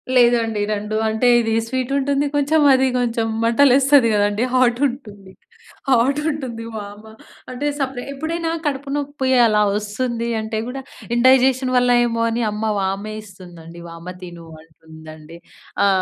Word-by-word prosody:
లేదండి. 235 Hz, -3 st, +3 dB
2, 210 Hz, +1 st, -4 dB
అంటే 220 Hz, +3 st, 0 dB
ఇది 225 Hz, -1 st, -1 dB
స్వీట్ 260 Hz, +1 st, -3 dB
ఉంటుంది 280 Hz, +1 st, 0 dB
కొంచెం, 290 Hz, +2 st, +2 dB
అది 265 Hz, 0 st, +3 dB
కొంచెం 230 Hz, -2 st, -1 dB, 0.2 s
మంటలేస్తది 265 Hz, +2 st, +4 dB
కదండీ, 205 Hz, +2 st, +1 dB
హాట్ 250 Hz, -1 st, +2 dB
ఉంటుంది. 210 Hz, -7 st, -10 dB, 0.6 s
హాట్ 265 Hz, +3 st, +2 dB
ఉంటుంది 260 Hz, -7 st, -5 dB
వామ. 205 Hz, 0 st, -8 dB, 0.5 s
అంటే 255 Hz, +3 st, -5 dB
సెపరేట్ 265 Hz, -2 st, -4 dB
ఎప్పుడైనా 325 Hz, +4 st, -3 dB, 0.2 s
కడుపు 280 Hz, -1 st, -3 dB
నొప్పి 285 Hz, -2 st, -3 dB, 0.2 s
అలా 215 Hz, -2 st, +2 dB, 0.2 s
ఒస్తుంది 230 Hz, +3 st, -3 dB
అంటే 220 Hz, 0 st, -4 dB
గూడా 270 Hz, +2 st, -6 dB, 0.3 s
ఇన్‌డైజెషన్ 260 Hz, +1 st, +3 dB
వల్ల 245 Hz, 0 st, +3 dB
ఏమో 230 Hz, -1 st, -2 dB
అని 230 Hz, +1 st, -2 dB
అమ్మ 210 Hz, +1 st, -4 dB
వామే 195 Hz, +2 st, -3 dB
ఇస్తుందండి. 175 Hz, -4 st, -13 dB
"వామ 165 Hz, +2 st, -9 dB
తిను" 175 Hz, -2 st, -10 dB, 0.2 s
అంటుందండి. 160 Hz, 0 st, -14 dB, 0.5 s
ఆ! -, -, +4 dB
235 Hz, 135 wpm, -20 LUFS, 205-265 Hz, 0.6 s, మంటలేస్తది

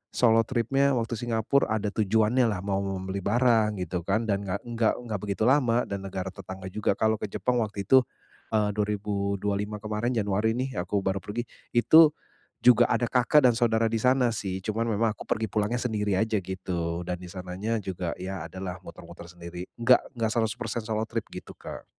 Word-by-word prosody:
solo 115 Hz, -2 st, +5 dB
tripnya 135 Hz, +3 st, +2 dB
waktu 115 Hz, 0 st, -2 dB
Singapore 120 Hz, +3 st, +1 dB
ada 105 Hz, -1 st, -1 dB
tujuannya 110 Hz, +4 st, +2 dB
lah 95 Hz, -4 st, -2 dB
mau 100 Hz, -1 st, 0 dB
membeli 95 Hz, 0 st, -3 dB
barang 110 Hz, 0 st, +2 dB
gitu 90 Hz, +1 st, -3 dB
kan 110 Hz, +4 st, +1 dB
dan 100 Hz, -2 st, -1 dB
nggak 95 Hz, +2 st, -3 dB
nggak 115 Hz, -2 st, +1 dB
nggak 110 Hz, -4 st, -4 dB
begitu 100 Hz, +1 st, -2 dB
lama 125 Hz, -2 st, +3 dB
dan 100 Hz, -1 st, -4 dB
negara 95 Hz, 0 st, -4 dB
tetangga 95 Hz, 0 st, -8 dB
juga. 100 Hz, -1 st, 0 dB
Kalau 110 Hz, 0 st, +1 dB
ke -, -, -3 dB
Jepang 125 Hz, +4 st, -1 dB
waktu 105 Hz, -3 st, -2 dB
itu, 130 Hz, +7 st, +6 dB, 0.5 s
eee, 105 Hz, -1 st, +2 dB
2025 105 Hz, 0 st, -2 dB
kemarin 110 Hz, +3 st, -2 dB
Januari 105 Hz, +1 st, +1 dB
nih 130 Hz, -3 st, -3 dB
aku 95 Hz, +3 st, -1 dB
baru 95 Hz, 0 st, 0 dB
pergi. 105 Hz, +5 st, -4 dB, 0.3 s
Itu 155 Hz, +5 st, +7 dB, 0.5 s
juga 120 Hz, -1 st, +6 dB
ada 120 Hz, -, +2 dB
kakak 130 Hz, +3 st, +4 dB
dan -, -, +2 dB
saudara 115 Hz, -1 st, +2 dB
di 115 Hz, -, +1 dB
sana 125 Hz, 0 st, +3 dB
sih. 95 Hz, -3 st, -4 dB
Cuman 115 Hz, +2 st, -1 dB
memang 110 Hz, 0 st, +1 dB
aku -, -, -10 dB
pergi 110 Hz, +1 st, 0 dB
pulangnya 105 Hz, +3 st, 0 dB
sendiri 105 Hz, -5 st, 0 dB
aja, 110 Hz, -2 st, +1 dB
gitu. 90 Hz, -2 st, -3 dB
Dan 90 Hz, -, -2 dB
di 90 Hz, -, -8 dB
sananya 95 Hz, +5 st, -3 dB
juga 90 Hz, -2 st, -4 dB
ya 95 Hz, -1 st, -5 dB
adalah 90 Hz, -1 st, -6 dB
muter-muter 85 Hz, -1 st, -11 dB
sendiri. 85 Hz, +1 st, -8 dB
Enggak 125 Hz, +2 st, +6 dB, 0.2 s
enggak 110 Hz, -1 st, +1 dB
100% 115 Hz, 0 st, -1 dB
solo 110 Hz, 0 st, -1 dB
trip -, -, -1 dB
gitu, -, -, -8 dB
Kak. -, -, -8 dB
105 Hz, 185 wpm, -27 LUFS, 95-115 Hz, 0.5 s, Itu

